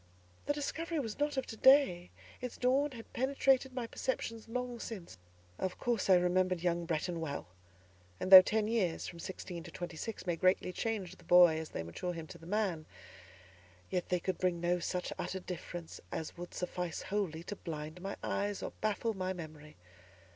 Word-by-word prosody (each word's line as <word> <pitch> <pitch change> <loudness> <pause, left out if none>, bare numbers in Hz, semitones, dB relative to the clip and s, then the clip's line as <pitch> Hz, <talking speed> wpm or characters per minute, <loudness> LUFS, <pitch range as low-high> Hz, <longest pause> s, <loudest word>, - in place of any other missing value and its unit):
The 290 - +3
discovery 325 +3 -3
was 225 -4 -4
not 290 -1 0
of 265 - 0
to 225 - -7
day, 240 -9 +5 0.3
its 250 -1 -5
dawn 265 +4 +3
had 230 -2 -11
penetrated 265 0 +2
my 250 -2 -3
perceptions 230 -2 -3
long 250 0 -3
since. 195 - -7 0.4
Of 185 -1 -2
course 235 -5 0
I 190 - +9
remembered 180 0 +2
young 170 -1 +1
Bretton 170 +1 -1
well; 145 -3 -3 0.7
and 185 - -3
though 190 -1 +15
ten 215 +3 0
years 210 -7 0
(from 170 - -8
sixteen 180 0 -6
to 175 - -10
twenty 175 -1 -6
six) 220 +4 -5
may 175 -2 0
greatly 185 +1 +2
change 215 -3 -2
the - - -19
boy 175 -3 +7
as 160 - -6
they 80 - -4
mature 85 - -4
him 165 -2 -6
to - - -11
the 165 - -12
man, 190 -6 -1 1.0
yet 180 - -1
they 180 - +2
could 185 +1 -2
bring 180 -2 +1
no 175 +1 +1
such 180 +1 -2
utter 190 - -3
difference 175 -2 -7
as 160 - -4
would 175 0 -8
suffice 180 -1 -3
wholly 185 -5 -2
to 205 - -5
blind 155 -1 -6
my 195 +2 -4
eyes, 205 0 -1
or - - -3
baffle 215 +1 0
my 185 -1 -2
memory. 155 -3 -9
185 Hz, 185 wpm, -33 LUFS, 170-225 Hz, 1.0 s, though